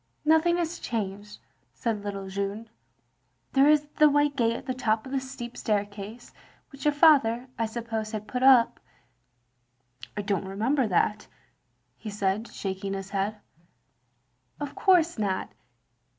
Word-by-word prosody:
"Nothing 320 Hz, +3 st, +4 dB
is 345 Hz, 0 st, -2 dB
changed," 205 Hz, -2 st, -4 dB, 0.4 s
said 220 Hz, -3 st, -2 dB
little 200 Hz, -1 st, -5 dB
Jeanne. 200 Hz, +3 st, -4 dB, 0.8 s
"There 275 Hz, +2 st, +5 dB
is 300 Hz, -1 st, +4 dB
the 305 Hz, 0 st, +8 dB
white 290 Hz, 0 st, +2 dB
gate 230 Hz, -3 st, +1 dB
at -, -, -7 dB
the 255 Hz, -, -2 dB
top 220 Hz, -3 st, 0 dB
of 260 Hz, -, -9 dB
the 275 Hz, -, +1 dB
steep 260 Hz, -2 st, -8 dB
staircase, 205 Hz, +2 st, -3 dB, 0.4 s
which 275 Hz, +1 st, -10 dB
your 295 Hz, -, +5 dB
father, 270 Hz, -6 st, +4 dB
I 225 Hz, -, +1 dB
suppose, 225 Hz, -1 st, -4 dB
had 215 Hz, -1 st, -5 dB
put 250 Hz, -, -3 dB
up." 260 Hz, -3 st, +6 dB, 0.7 s
" 120 Hz, +1 st, -19 dB
I 205 Hz, -, -2 dB
don't 200 Hz, -2 st, -1 dB
remember 230 Hz, +7 st, 0 dB
that, 210 Hz, +2 st, +1 dB, 0.4 s
" 125 Hz, +1 st, -46 dB
he 220 Hz, -, -6 dB
said, 205 Hz, +2 st, -1 dB
shaking 195 Hz, 0 st, -4 dB
his 195 Hz, 0 st, -7 dB
head. 200 Hz, +1 st, -1 dB, 1.2 s
"Of 290 Hz, -2 st, -5 dB
course 345 Hz, -, +3 dB
not. 195 Hz, -3 st, -1 dB
220 Hz, 150 wpm, -27 LUFS, 200-270 Hz, 1.2 s, the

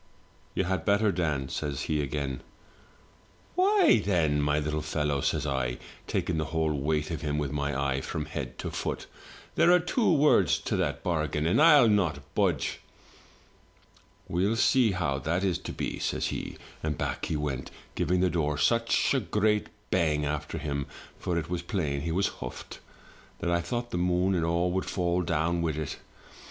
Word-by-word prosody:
" -, -, -33 dB
'You -, -, +2 dB
had 95 Hz, +1 st, -1 dB
better, 105 Hz, 0 st, +3 dB
Dan,' 75 Hz, -8 st, -1 dB
says 70 Hz, -2 st, -3 dB
he 75 Hz, 0 st, 0 dB
again. 70 Hz, -2 st, -3 dB, 0.6 s
" -, -, -31 dB
'Why, 380 Hz, -1 st, +5 dB
then, 80 Hz, -7 st, +2 dB
my 75 Hz, +1 st, +2 dB
Uttle 75 Hz, 0 st, -2 dB
fellow,' 75 Hz, -3 st, -1 dB
says -, -, 0 dB
I, 65 Hz, -4 st, -1 dB, 0.3 s
taking 80 Hz, -2 st, -1 dB
the 80 Hz, -, -1 dB
whole 80 Hz, 0 st, 0 dB
weight 75 Hz, +2 st, -1 dB
of 80 Hz, -, -3 dB
him 75 Hz, -2 st, -1 dB
with 75 Hz, -2 st, -1 dB
my 70 Hz, -2 st, -1 dB
eye 70 Hz, -1 st, 0 dB
from 75 Hz, +2 st, -4 dB
head 75 Hz, -, -6 dB
to -, -, -4 dB
foot, -, -, -3 dB, 0.5 s
'there 175 Hz, -, +5 dB
are 180 Hz, -, +7 dB
two 180 Hz, +7 st, +1 dB
words 150 Hz, -2 st, +4 dB
to -, -, -2 dB
that -, -, -1 dB
bargain; 80 Hz, -3 st, 0 dB
and 85 Hz, -, +3 dB
I'll 150 Hz, -6 st, +8 dB
not 100 Hz, -7 st, +1 dB
budge!' -, -, 0 dB, 0.7 s
" -, -, -32 dB
'We'll 95 Hz, +6 st, +1 dB
see 120 Hz, -2 st, +4 dB
how 85 Hz, -7 st, -1 dB
that 85 Hz, +6 st, -1 dB
is 90 Hz, -3 st, +1 dB
to -, -, -6 dB
be,' -, -, -4 dB
says -, -, -1 dB
he; -, -, -5 dB, 0.2 s
and 75 Hz, -2 st, -2 dB
back -, -, -2 dB
he 80 Hz, -, -1 dB
went, 70 Hz, -3 st, -3 dB, 0.2 s
giving 90 Hz, +1 st, +1 dB
the 90 Hz, -1 st, +2 dB
door 75 Hz, -3 st, 0 dB
such 115 Hz, -, +2 dB
a 135 Hz, -, +3 dB
great 105 Hz, -1 st, +1 dB, 0.2 s
bang 75 Hz, -5 st, +2 dB
after 75 Hz, 0 st, -3 dB
him 70 Hz, -1 st, -3 dB, 0.3 s
(for 85 Hz, -, -1 dB
it 80 Hz, -2 st, -2 dB
was 90 Hz, 0 st, -2 dB
plain 75 Hz, -6 st, -2 dB
he 80 Hz, -, -2 dB
was 95 Hz, +4 st, +1 dB
huffed) 60 Hz, -, -7 dB, 0.6 s
that 85 Hz, -, -2 dB
I 85 Hz, 0 st, +2 dB
thought 120 Hz, +7 st, -3 dB
the 90 Hz, -, -1 dB
moon 90 Hz, +2 st, +2 dB
and 85 Hz, -3 st, +1 dB
all 85 Hz, +2 st, +1 dB
would 95 Hz, +1 st, -1 dB
fall 90 Hz, -1 st, 0 dB
down 85 Hz, 0 st, 0 dB
with 80 Hz, -3 st, -1 dB
it. 75 Hz, -, -4 dB
80 Hz, 185 wpm, -28 LUFS, 75-95 Hz, 0.7 s, I'll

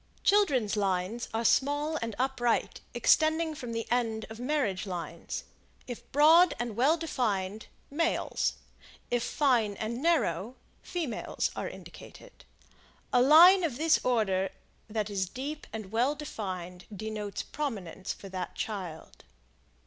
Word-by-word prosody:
Children's 275 Hz, -, +3 dB
Lines 195 Hz, +3 st, -1 dB
are 225 Hz, +1 st, -2 dB
small 290 Hz, +6 st, +2 dB
and 230 Hz, -2 st, -3 dB
upright, 250 Hz, -2 st, 0 dB
extending 315 Hz, 0 st, +3 dB
from 245 Hz, -5 st, -7 dB
the 230 Hz, 0 st, -3 dB
end 225 Hz, -3 st, 0 dB
of 220 Hz, -, -9 dB
Marriage 245 Hz, -8 st, -1 dB
Lines. 170 Hz, -2 st, -5 dB, 0.4 s
If 245 Hz, -2 st, -9 dB
broad 315 Hz, +4 st, +6 dB
and 240 Hz, -3 st, -3 dB
well 275 Hz, +8 st, +3 dB
defined, 215 Hz, -, -2 dB, 0.2 s
males; 330 Hz, +3 st, 0 dB, 0.6 s
if 245 Hz, -1 st, +2 dB
fine 235 Hz, -6 st, +1 dB
and 230 Hz, +4 st, -4 dB
narrow, 250 Hz, -, +1 dB, 0.3 s
females 325 Hz, -9 st, -3 dB
are -, -, -3 dB
indicated. -, -, -13 dB, 0.7 s
A 250 Hz, -, +5 dB
line 345 Hz, +8 st, +8 dB
of 290 Hz, -8 st, -1 dB
this 320 Hz, +2 st, +3 dB
order 195 Hz, -6 st, +1 dB, 0.4 s
that 215 Hz, -1 st, -2 dB
is 190 Hz, -2 st, -1 dB
deep 290 Hz, +6 st, -6 dB
and 215 Hz, -3 st, -7 dB
well 245 Hz, +6 st, +2 dB
defined 185 Hz, -, -6 dB
denotes 210 Hz, 0 st, -4 dB
prominence 200 Hz, -, -4 dB
for 195 Hz, -, -8 dB
that 185 Hz, -2 st, -5 dB
child. 185 Hz, -7 st, -6 dB
235 Hz, 125 wpm, -29 LUFS, 200-295 Hz, 0.7 s, line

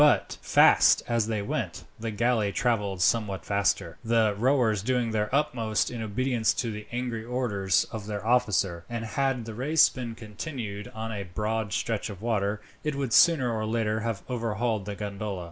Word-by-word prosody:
But, 150 Hz, -1 st, +3 dB
fast -, -, +5 dB
as 115 Hz, -2 st, +1 dB
they 110 Hz, -2 st, -1 dB
went, -, -, -3 dB, 0.2 s
the 115 Hz, 0 st, -3 dB
galley 110 Hz, -1 st, +1 dB
travelled 105 Hz, -6 st, 0 dB
somewhat 105 Hz, -4 st, +1 dB
faster, 100 Hz, -4 st, 0 dB
the 115 Hz, -2 st, +3 dB
rowers 115 Hz, -2 st, +2 dB
doing 120 Hz, +1 st, 0 dB
their 105 Hz, -1 st, 0 dB
utmost 115 Hz, -7 st, 0 dB
in 120 Hz, -2 st, -5 dB
obedience 115 Hz, +2 st, 0 dB
to 120 Hz, -5 st, -2 dB
the 105 Hz, 0 st, -7 dB
angry 120 Hz, -2 st, -3 dB
orders 110 Hz, -6 st, 0 dB
of 105 Hz, -2 st, -6 dB
their 105 Hz, 0 st, -4 dB
officer; 100 Hz, -7 st, +1 dB
and 115 Hz, -1 st, -4 dB
had 130 Hz, +1 st, -1 dB
the 115 Hz, -, -6 dB
race 145 Hz, +8 st, +4 dB
been 120 Hz, -3 st, -6 dB
continued 110 Hz, -2 st, -6 dB
on 110 Hz, 0 st, -4 dB
a 105 Hz, -2 st, -4 dB
broad 105 Hz, +3 st, -2 dB
stretch 110 Hz, +3 st, -1 dB
of 100 Hz, -3 st, -8 dB
water, 105 Hz, -2 st, -1 dB, 0.2 s
it 150 Hz, -2 st, -1 dB
would 135 Hz, -4 st, -2 dB
sooner 145 Hz, -9 st, +5 dB
or 110 Hz, -1 st, -2 dB
later 110 Hz, -1 st, 0 dB
have 110 Hz, -3 st, -3 dB
overhauled 115 Hz, -3 st, -1 dB
the 105 Hz, -1 st, -5 dB
gondola. 100 Hz, -1 st, -4 dB
110 Hz, 175 wpm, -27 LUFS, 105-120 Hz, 0.2 s, fast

